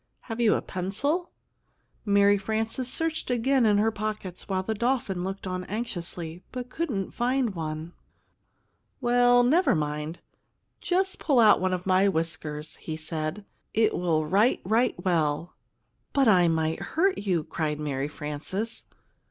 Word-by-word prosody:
Have 225 Hz, 0 st, -5 dB
you 225 Hz, -2 st, +4 dB
a -, -, -2 dB
pencil?" 260 Hz, -, -1 dB, 0.8 s
Mary 200 Hz, 0 st, +5 dB
Frances 225 Hz, +5 st, -2 dB
searched 325 Hz, -3 st, -2 dB
again 250 Hz, 0 st, +3 dB
in 205 Hz, -1 st, +4 dB
her 220 Hz, +2 st, +3 dB
pockets, 210 Hz, -4 st, -5 dB
while 190 Hz, -1 st, 0 dB
the 220 Hz, -, -1 dB
dolphin 220 Hz, -5 st, -1 dB
looked 195 Hz, +1 st, -5 dB
on 185 Hz, -1 st, -3 dB
anxiously, 175 Hz, -6 st, -4 dB
but 250 Hz, -1 st, -6 dB
couldn't 250 Hz, -, -2 dB
find 245 Hz, -2 st, 0 dB
one. 160 Hz, 0 st, -5 dB, 1.1 s
"Well, 245 Hz, 0 st, +4 dB
never 275 Hz, -, +4 dB
mind; 150 Hz, +2 st, -3 dB, 0.6 s
just 380 Hz, +1 st, 0 dB
pull 275 Hz, -5 st, +2 dB
out 215 Hz, -4 st, +6 dB
one 185 Hz, 0 st, +1 dB
of 180 Hz, -1 st, -2 dB
my 190 Hz, +1 st, +4 dB
whiskers," 160 Hz, -3 st, -3 dB
he 155 Hz, -1 st, -6 dB
said. 160 Hz, +4 st, -4 dB, 0.3 s
"It 220 Hz, 0 st, +3 dB
will 160 Hz, -3 st, +1 dB
write 200 Hz, +10 st, +3 dB
right 225 Hz, +6 st, +2 dB
well." 165 Hz, -1 st, 0 dB, 0.6 s
"But 275 Hz, -3 st, +3 dB
I 180 Hz, -5 st, +6 dB
might 160 Hz, -1 st, 0 dB
hurt 375 Hz, +4 st, +1 dB
you!" 185 Hz, -6 st, 0 dB
cried 150 Hz, -1 st, -3 dB
Mary 140 Hz, -2 st, -2 dB
Frances. 155 Hz, +10 st, -4 dB
200 Hz, 145 wpm, -27 LUFS, 165-240 Hz, 1.1 s, out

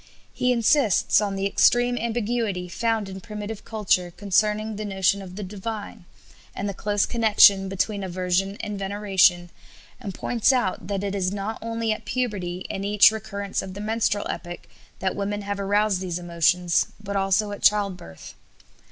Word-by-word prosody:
He 250 Hz, -, +1 dB
insists 235 Hz, -, +3 dB
on 200 Hz, -2 st, -2 dB
the 195 Hz, 0 st, -2 dB
extreme 245 Hz, +4 st, +3 dB
ambiguity 225 Hz, -5 st, -2 dB
found 225 Hz, +3 st, -1 dB
in 190 Hz, 0 st, -8 dB
primitive 210 Hz, +1 st, -7 dB
culture 195 Hz, -5 st, 0 dB
concerning 210 Hz, +3 st, 0 dB
the 215 Hz, -, -5 dB
notion 195 Hz, 0 st, +1 dB
of 185 Hz, -1 st, -10 dB
the 205 Hz, -, -5 dB
divine, 205 Hz, 0 st, -7 dB, 0.5 s
and 200 Hz, -, -3 dB
the 200 Hz, -, -3 dB
close 205 Hz, +2 st, 0 dB
connection 205 Hz, -4 st, +5 dB
between 200 Hz, +1 st, -2 dB
aversion 185 Hz, +2 st, -1 dB
and 210 Hz, -1 st, -5 dB
veneration, 195 Hz, -3 st, +2 dB, 0.5 s
and 215 Hz, -6 st, -6 dB
points 240 Hz, +1 st, +2 dB
out 215 Hz, -9 st, -1 dB
that 200 Hz, 0 st, -2 dB
it 200 Hz, -1 st, -2 dB
is 190 Hz, -2 st, -1 dB
not 205 Hz, +2 st, -4 dB
only 230 Hz, 0 st, -2 dB
at 215 Hz, 0 st, -4 dB
puberty 205 Hz, -7 st, -3 dB
and 195 Hz, -, -4 dB
each 205 Hz, +1 st, +6 dB
recurrence 200 Hz, -2 st, -4 dB
of 190 Hz, -1 st, -8 dB
the -, -, -7 dB
menstrual 210 Hz, -1 st, 0 dB
epoch 175 Hz, -1 st, -6 dB, 0.4 s
that 190 Hz, -, -2 dB
women 205 Hz, +1 st, -3 dB
have 200 Hz, 0 st, -4 dB
aroused 200 Hz, -1 st, +1 dB
these 180 Hz, -2 st, -3 dB
emotions, 175 Hz, 0 st, +1 dB
but 200 Hz, -1 st, -6 dB
also 195 Hz, +2 st, +1 dB
at 205 Hz, -, -7 dB
childbirth. 200 Hz, -, 0 dB
200 Hz, 160 wpm, -24 LUFS, 190-215 Hz, 0.5 s, each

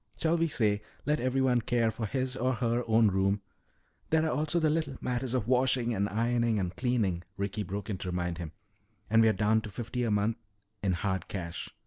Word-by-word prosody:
Shall 165 Hz, +1 st, +2 dB
we 165 Hz, 0 st, +2 dB
say, 105 Hz, -8 st, +1 dB, 0.2 s
let 150 Hz, +1 st, +1 dB
everyone 130 Hz, -1 st, +2 dB
care 115 Hz, 0 st, +1 dB
for 110 Hz, 0 st, -4 dB
his 130 Hz, +1 st, -2 dB
or 130 Hz, 0 st, +1 dB
her 120 Hz, 0 st, 0 dB
own 110 Hz, -1 st, +5 dB
room 95 Hz, +1 st, +1 dB, 0.3 s
" -, -, -40 dB
"There 160 Hz, 0 st, +3 dB
are 160 Hz, -, +1 dB
also 155 Hz, +4 st, +1 dB
the 155 Hz, -2 st, +3 dB
little 155 Hz, -4 st, -1 dB
matters 125 Hz, 0 st, -2 dB
of 120 Hz, -4 st, -1 dB
washing, 125 Hz, -1 st, +2 dB
and 100 Hz, -1 st, 0 dB
ironing, 115 Hz, +1 st, +1 dB
and 90 Hz, -2 st, -2 dB
cleaning," 115 Hz, -9 st, 0 dB, 0.2 s
Ricky 100 Hz, +2 st, -2 dB
broke 100 Hz, +1 st, -4 dB
in 100 Hz, -5 st, -3 dB
to 95 Hz, -, -4 dB
remind 90 Hz, -1 st, -2 dB
him. 85 Hz, -3 st, -5 dB, 0.6 s
"And 115 Hz, 0 st, +6 dB
we're 110 Hz, -1 st, +6 dB
down 110 Hz, +1 st, +2 dB
to 110 Hz, -, -7 dB
fifty 120 Hz, +4 st, -3 dB
a 115 Hz, -, 0 dB
month 105 Hz, +2 st, +1 dB, 0.4 s
in 95 Hz, -2 st, +1 dB
hard 95 Hz, +1 st, -2 dB
cash. 85 Hz, -3 st, -5 dB
115 Hz, 205 wpm, -30 LUFS, 100-130 Hz, 0.6 s, And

